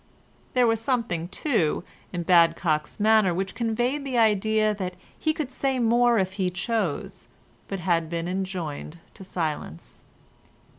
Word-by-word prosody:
There 250 -1 +5
was 225 -1 +2
something, 225 -10 -1
too, 190 - 0 0.3
in 175 -2 -3
Badcock's 165 -2 +3
manner 215 -4 +4
which 190 +1 -2
conveyed 240 +5 -1
the 265 -3 -2
idea 215 -1 +3
that 185 -3 -4 0.2
he 315 - 0
could 305 -4 -4
say 265 0 0
more 240 0 +4
if 190 -2 0
he 185 - +2
chose, 190 - -3 0.4
but 195 - -4
had 165 -2 +1
been 170 0 -3
enjoined 180 -4 -4
to - - -11
silence. 155 - -5
195 Hz, 140 wpm, -25 LUFS, 175-230 Hz, 0.4 s, There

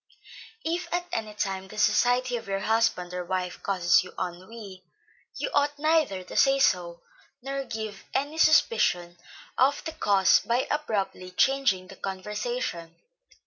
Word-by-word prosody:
If 340 +2 -2
at 350 0 -1
any 215 -2 -3
time 190 -2 -3
the 215 - -11
society 245 +4 +2
of 230 - -6
your 195 0 -2
husband 220 -6 +1
or 180 0 -3
wife 180 0 -3
causes 180 -4 +3
you 180 - -12
ennui, 185 +2 -7 0.5
you - - -3
ought 290 0 +1
neither 305 - +1
to 180 - -10
say 275 0 +4
so, 175 -9 +1 0.4
nor 275 0 -3
give 220 -3 -6
any 290 +4 -2
suspicion 180 - +3 0.4
of 275 +3 +3
the 320 - -4
cause 200 -11 +4
by 240 +3 0
abruptly 205 -10 -2
changing 200 -2 +2
the - - -12
conversation. 195 -3 -4
215 Hz, 145 wpm, -27 LUFS, 185-270 Hz, 0.5 s, say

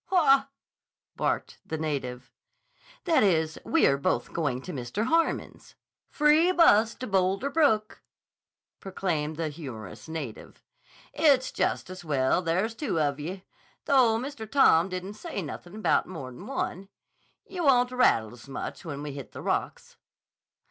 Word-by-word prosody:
"Haw!" 275 -7 +4 0.7
barked - - -2
the 160 - -4
native. 130 -5 -4 0.7
"That 335 -3 +3
is, 160 -6 +1
we 330 - +3
are 140 0 +3
both 120 -3 -1
going 135 -6 -1
to 180 - -7
Mr. 135 - -3
Harmon's." 330 +5 -1 0.3
"Free 305 +4 +4
bus 230 - +5
to 255 - -6
Boulder 195 +5 0
Brook," 270 -9 +1 0.8
proclaimed 160 -6 -2
the 160 0 -2
humorous 120 - -9
native. 150 -9 -7 0.5
"It's 275 -5 +3
jest - - -1
as 185 -1 -9
well 140 +1 +1
there's 185 +6 0
two 225 - -2
of 145 -2 0
ye, 185 +6 -6 0.4
though 255 -6 +4
Mr. 240 -3 -6
Tom 190 -10 +5
didn't 185 +2 -5
say 320 - -6
nothin' 175 +5 -8
about 215 - +1
more'n 160 - -8
one. 195 -7 -4 0.6
Ye 375 - -8
won't 250 -6 +4
rattle 115 - +2
s' 120 +2 -14
much 135 - -6
when 145 -3 -6
we 150 - -5
hit 140 -2 -9
the - - -8
rocks." - - -3
185 Hz, 140 wpm, -27 LUFS, -, 0.8 s, bus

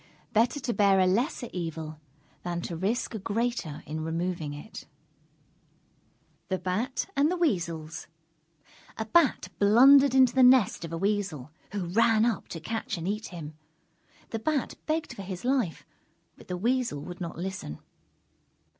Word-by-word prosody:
Better 235 +6 +3
to 245 -3 -2
bear 200 -2 +4
a 185 - +5
lesser 240 - 0
evil 160 -3 -5 0.4
than 175 -1 -3
to 170 - -5
risk 205 +10 -1
a 220 - -4
greater 210 - -2
in 155 +1 -4
removing 165 -1 -2
it. 145 +9 -9 1.6
THE 190 - -1
BAT 215 +10 -2
AND 285 +2 +3
THE 360 - -1
WEASELS 170 - -1 0.9
A 220 - -2
Bat 290 +4 +3
blundered 265 +6 +7
into 260 -2 +6
the 265 - +4
nest 250 -8 +5
of 165 - -6
a 165 - -3
Weasel, 190 -8 -1 0.2
who 200 -3 -2
ran 225 +4 +3
up 235 -3 -1
to 165 - -6
catch 225 +3 -3
and 165 +1 -4
eat 215 +2 -2
him. 160 -4 -8 0.8
The 225 - -2
Bat 290 +3 -1
begged 315 +1 -1
for - - -8
his 185 +1 -6
life, 250 -10 0 0.5
but - - -17
the 180 - -3
Weasel 235 - 0
would 175 +3 -8
not 170 -2 -5
listen. 180 - -5
200 Hz, 155 wpm, -28 LUFS, 170-240 Hz, 1.6 s, blundered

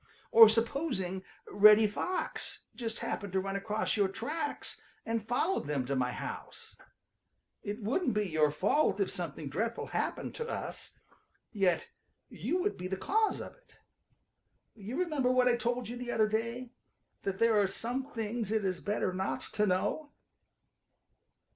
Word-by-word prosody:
Or 225 -1 +10
supposing 225 - -1 0.2
Reddy 215 +1 +7
Fox 285 - -3
just 225 -2 -3
happened 200 -3 -3
to 190 - +3
run 195 +1 -3
across 210 +2 -1
your 205 -3 +3
tracks 295 - -4 0.2
and 225 -1 -2
followed 245 - 0
them 140 -4 -1
to 140 +2 -1
my 125 -1 +1
house. - - -7 0.9
It 210 +2 -5
wouldn't 255 - +1
be 210 -1 +1
your 155 -3 +3
fault 205 - +2
if 200 - +1
something 160 -4 -4
dreadful 225 +12 -2
happened - - -2
to 465 0 -5
us, - - -5 0.6
yet 195 -5 +1 0.4
you 360 - -2
would 410 +3 -1
be 180 - -4
the 190 +1 -2
cause 430 - +1
of - - -8
it. - - -25 1.0
You 225 +5 -6
remember 305 -8 +1
what 255 0 +4
I 245 - +5
told 240 0 -1
you 240 +2 -5
the 245 0 -6
other 215 -2 +3
day, 230 +3 -2 0.5
that 195 -1 -2
there 225 -1 +4
are 200 - +3
some 255 +8 -4
things 225 -1 -3
it 220 -2 +1
is 185 -2 -1
better 205 -3 -1
not 190 +1 -3
to 210 0 +2
know." 200 +11 0
220 Hz, 155 wpm, -31 LUFS, 195-245 Hz, 1.0 s, Or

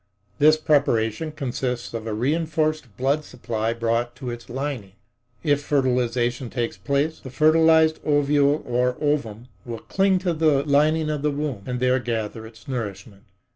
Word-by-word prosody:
This 155 +2 +6
preparation 145 -2 +1
consists 125 -4 -3
of 115 -1 -5
a 110 - -2
reinforced 155 -1 -1
blood 140 +4 +1
supply 115 -5 -3
brought 115 +1 -1
to 130 -2 -5
its 120 0 -9
lining. 130 -7 -4 0.5
If 145 -3 +2
fertilization 125 -3 0
takes 120 -1 -2
place, 145 +3 -1
the 130 - -9
fertilized 160 +2 +4
ovule 145 0 +2
or 125 +1 0
ovum 125 -6 -2
will 120 -2 -6
cling 190 - +1
to 175 - +2
the 155 -3 +2
lining 155 +2 +2
of 150 -2 -3
the 150 - +1
womb 145 -6 -3
and 125 -1 -2
there 125 +1 +2
gather 110 -2 -4
its 110 +4 -17
nourishment. 100 -5 -6
130 Hz, 150 wpm, -23 LUFS, 120-150 Hz, 0.5 s, This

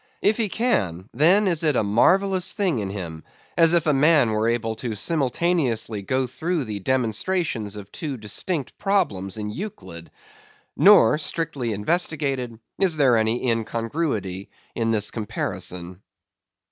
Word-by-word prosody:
If 210 +1 +3
he 220 -3 0
can, 100 - -1
then 180 - +4
is 170 -3 +1
it 150 -3 +2
as 110 - +1
marvellous 185 - +2
a - - -12
thing 185 - 0
in 100 -2 -3
him, 85 -5 -7 0.3
as 165 0 +5
if 170 -1 +2
a 150 - +3
man 145 -3 +4
were 110 +1 0
able 115 -1 -1
simultaneously 125 - -1
to - - -15
go 130 0 +1
through 160 +6 -2
the 105 -4 -5
demonstrations 120 - -1
of 100 -1 -10
two 145 -5 -5
distinct 125 - -3
problems 105 - -1
in 105 -1 -4
Euclid. 95 - -8 0.7
Nor, 130 +7 +6
strictly 145 -6 -3
investigated, 135 - -1 0.2
is 180 -5 +2
there 135 -5 +4
any 110 +3 0
incongruity 115 - -2 0.2
in 115 -1 -1
this 105 -2 +2
comparison. 90 -4 -4
120 Hz, 145 wpm, -23 LUFS, 105-165 Hz, 0.7 s, Nor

